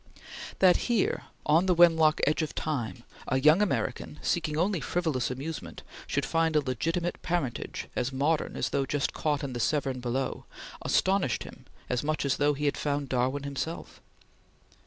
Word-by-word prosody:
That 185 -2 +6
here, 230 -5 +1 0.2
on 165 +5 +4
the 180 - +4
Wenlock 165 -2 +5
Edge 155 +3 +1
of 155 - -3
time, 125 -6 -3 0.2
a 130 - +1
young 155 +7 +5
American, 185 -6 -1
seeking 155 -3 0
only 180 +2 +1
frivolous 160 -7 -1
amusement, 140 +5 -6 0.2
should - - 0
find 165 -1 +1
a - - +6
legitimate 165 +6 -2
parentage 170 -9 -3
as 125 - -1
modern 145 +4 0
as 115 - -1
though 135 +2 0
just 145 -1 -1
caught 150 -2 -1
in 135 -2 -4
the 120 - -4
Severn 135 -1 0
below, 125 +2 -2 0.4
astonished 190 - +1
him - - -12 0.2
as 125 -1 0
much 155 0 -1
as 140 - +1
though 145 0 +2
he 145 +2 -3
had 145 - +1
found 145 -2 -1
Darwin 130 +2 0
himself. 140 +4 -5
150 Hz, 165 wpm, -28 LUFS, 135-165 Hz, 0.4 s, That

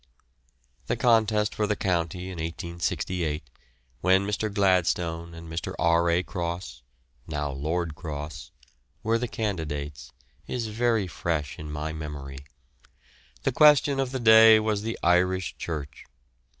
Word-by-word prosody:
The - - 0
contest 110 -3 +3
for 105 - 0
the 105 - +1
County 90 -1 -1
in 90 - -7
1868, 85 -1 -3 0.6
when 95 +2 +3
Mr. 105 +1 -2
Gladstone 85 -4 +1
and 85 0 -10
Mr. 80 +1 -4
R. 85 +1 +3
A. 85 +2 +2
Cross 85 -1 -5 0.5
(now 75 -2 -2
Lord 80 +4 -2
Cross) 75 -2 -7 0.5
were 115 +1 +2
the 125 - -2
candidates, 75 - -4 0.4
is 115 -3 -3
very 115 -1 +1
fresh 80 -5 -3
in 75 -1 -7
my 75 +1 -4
memory. 70 -3 -7 1.0
The - - +1
question 145 -2 +5
of 135 -2 -1
the 130 - -3
day 110 -1 +8
was 110 -1 0
the 115 +1 -4
Irish 90 +1 +2
church. 70 -4 -6
85 Hz, 130 wpm, -26 LUFS, 80-105 Hz, 1.0 s, day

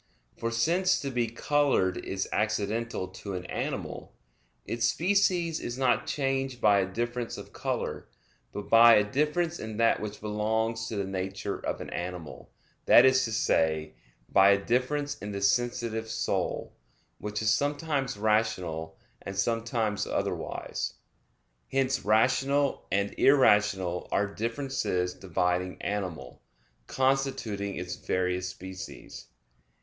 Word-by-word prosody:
For 115 - -2
since 175 +11 +2
to 140 - -3
be 120 -2 0
colored 130 -5 +1
is 95 0 -3
accidental 110 -1 -1
to 95 +1 -7
an 90 0 -5
animal, - - -5 0.5
its 115 0 0
species 175 0 +2
is 120 +1 -5
not 130 -2 +2
changed 135 -2 -1
by 105 -3 +5
a 95 - 0
difference 120 +2 -3
of - - -10
color, - - -3 0.4
but 105 - -6
by 115 +1 +8
a 105 - +5
difference 150 +9 0
in 110 -1 -6
that 115 0 +3
which 105 -1 -6
belongs 110 +2 -1
to 110 - -4
the 100 - -1
nature 95 +1 -4
of - - -3
an - - -7
animal, 90 -3 -6 0.4
that - - +8
is 130 0 +5
to 115 - -4
say, 80 -7 +1 0.3
by 95 +1 +6
a 100 - +6
difference 145 +4 0
in 105 0 -6
the 100 - -3
sensitive 115 +1 0
soul, - - -2 0.4
which 105 0 -4
is 110 - +3
sometimes 145 0 0
rational, 95 -7 0 0.2
and 100 0 -7
sometimes 115 0 0
otherwise. - - -3 0.8
Hence 135 -1 +1
"rational" 130 +6 +2
and 100 +1 0
"irrational" 105 -9 +3
are 105 - +2
differences 115 -4 -2
dividing 90 0 -1
animal, 95 -6 -4 0.5
constituting 130 -7 0
its 90 0 -4
various 90 0 -1
species. 95 0 -9
110 Hz, 130 wpm, -28 LUFS, 95-130 Hz, 0.8 s, by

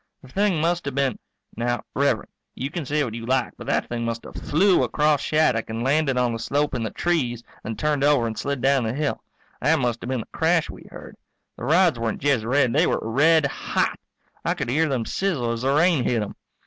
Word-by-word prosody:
The 130 - -14
thing 195 +1 +1
must 170 +1 0
have 140 -2 -4
been 135 -4 0 0.4
now, 120 0 -1
Rev'rend, - - +1 0.2
you 135 +2 -4
can 160 -4 -4
say 150 +1 +1
what 120 -5 -4
you 115 0 -6
like 130 -1 +1
but - - -10
that - - 0
thing 120 -1 -3
must 115 0 -3
have - - -11
flew 185 +4 +2
across 150 -1 +2
Shattuck 150 -9 +1
and 115 +1 -3
landed 135 0 +2
on 125 -1 +1
the 115 - -4
slope 145 +5 0
in 125 - -2
the 110 - -2
trees, 125 -5 -1 0.2
then 115 - -5
turned 145 +4 0
over 145 -4 +4
and 110 -1 -3
slid 140 0 -3
down 135 -1 +3
the 110 - -1
hill. 150 0 -2 0.4
That 155 +5 +3
must 120 -4 -1
have 120 - -6
been 130 -3 -1
the - - -9
crash 165 0 +1
we - - -13
heard. - - -11 0.4
The - - -7
rods 165 -2 +3
weren't 115 -2 -2
just 140 -5 +1
red, 125 0 +2
they - - +3
were - - +1
red 150 +7 +3
hot. 135 - -1 0.4
I - - 0
could - - -3
hear 155 +3 +2
them 125 -4 -1
sizzle 145 - -1
as 115 -1 -3
the 135 +1 +1
rain 155 -1 +3
hit 115 -3 +1
'em. 105 - -7
135 Hz, 230 wpm, -24 LUFS, 120-155 Hz, 0.4 s, over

